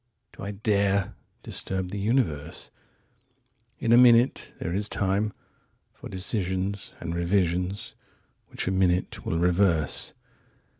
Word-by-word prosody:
45Do - - -10
I 100 - -3 0.9
dare46Disturb 95 -1 -3
the 100 - -3
universe?47In 120 - -4
a - - +8
minute 120 +1 +5
there 85 - -3
is 100 +2 -1
time48For 100 +2 -4
decisions 95 0 -2
and 85 0 -4
revisions 90 +2 0 0.5
which - - -4
a - - +2
minute 90 -1 +1
will 80 - 0
reverse. 85 -3 +1
95 Hz, 100 wpm, -26 LUFS, 90-115 Hz, 0.9 s, a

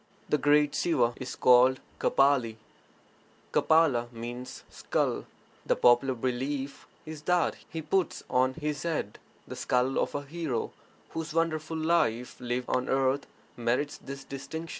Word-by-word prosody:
[The 150 - +2
great 145 0 +4
Siva 125 -10 +2
is 130 -1 -6
called 125 +1 +5 0.2
Kapali; 135 -5 +3 1.0
Kapala 140 -7 +3
meaning 120 +2 -6
'skull'. - - -3 0.4
The - - +1
popular 120 +2 +4
belief 135 +3 -3 0.2
is 155 -1 -8
that 180 -1 +2
He 160 -1 -5
puts 175 +3 0
on 130 +1 +2
His 150 -2 -3
head 160 -11 -3 0.3
the - - -7
skull 125 +1 +1
of - - -1
a 145 - -2
hero 145 -5 -3 0.4
whose 160 -1 -5
wonderful 160 -1 0
life 155 -8 +1
lived 125 0 -2
on 130 +1 0
earth 135 +1 +1 0.3
merits 120 +5 -1
this 140 0 -8
distinction. 160 +4 -7
135 Hz, 135 wpm, -29 LUFS, 125-155 Hz, 1.0 s, called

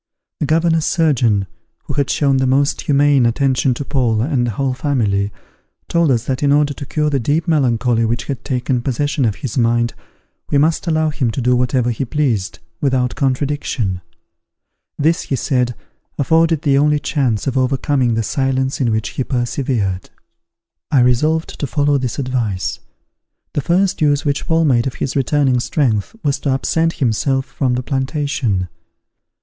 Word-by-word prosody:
The 150 - -1
governor's 165 0 +2
surgeon, 125 - +2 0.4
who - - -5
had 140 0 0
shown 140 -2 +2
the 130 0 +1
most 140 +2 +1
humane 145 -2 +3
attention 130 +1 +1
to 140 - -5
Paul 120 -6 +1
and 130 -4 0
the - - -1
whole 135 -2 0
family, 110 -8 0 0.6
told 170 -2 +2
us 120 -4 +2
that 130 -1 -2
in 140 -1 +2
order 145 0 +3
to 140 0 -8
cure 150 -1 0
the 140 - +1
deep 150 +7 0
melancholy 125 -6 +2
which 115 +1 -1
had 135 -4 -5
taken 125 -1 -1
possession 140 +2 -1
of 105 -3 0
his 130 0 -2
mind, 120 0 +1 0.6
we 145 - +2
must 160 +5 +1
allow 155 -1 +1
him 135 -5 -1
to 115 - -3
do 125 0 +2
whatever 125 0 +1
he 115 - -2
pleased, 120 -7 -1 0.2
without 130 -3 +1
contradiction: 130 -8 -1 1.0
this, 160 +3 +2
he 135 - -2
said, 125 -1 0 0.4
afforded 160 +2 +2
the 140 -3 +3
only 150 +1 +3
chance 130 -8 -1
of 135 - -1
overcoming 130 -1 +1
the 115 - 0
silence 135 +3 -1
in 120 -3 +2
which 110 -2 -1
he 130 - -3
persevered. 120 -7 -2 0.8
I 135 - +4
resolved 150 +7 +1
to 140 - -2
follow 145 +1 +1
this 125 -3 -3
advice. 120 -9 -2 0.7
The 145 - 0
first 180 +4 +1
use 145 -1 +2
which 145 -1 -1
Paul 165 0 +2
made 125 -4 +2
of 130 - -4
his 135 - -3
returning 135 -1 +2
strength 120 - 0
was 145 -1 0
to 140 - -2
absent 160 +5 +1
himself 135 +1 0
from 130 -4 -1
the 125 - -2
plantation. 135 - -1
135 Hz, 165 wpm, -18 LUFS, 120-145 Hz, 1.0 s, I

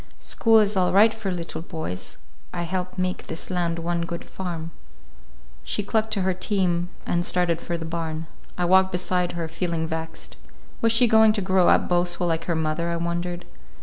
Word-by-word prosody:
School 225 -1 +3
is 210 -1 +3
all 185 -1 +2
right 215 +4 +6
for 215 -3 -4
little 170 -3 -4
boys. 160 - -5 0.3
I 175 - -3
help 185 +2 -3
make 185 0 -2
this 165 - -5
land 170 -2 0
one 170 +1 -1
good 170 0 -4
farm." 170 -3 -6 0.9
She 210 - -2
clucked 220 +1 0
to 195 -3 0
her 190 0 +2
team 180 -2 0 0.2
and 175 0 0
started 175 -2 +1
for 170 - -3
the 165 - -6
barn. 160 -1 -3 0.3
I 180 - +1
walked 190 +1 +5
beside 180 0 0
her, 170 -2 -3
feeling 165 0 -2
vexed. 160 0 -6 0.4
Was 230 - +4
she 230 +2 +5
going 220 -1 +6
to 210 - -1
grow 185 -1 +3
up - - +4
boastful 175 0 +1
like 165 -1 -1
her 170 - 0
mother, 160 +1 -1
I 170 - -1
wondered? 175 +1 -3
175 Hz, 185 wpm, -24 LUFS, 170-190 Hz, 0.9 s, right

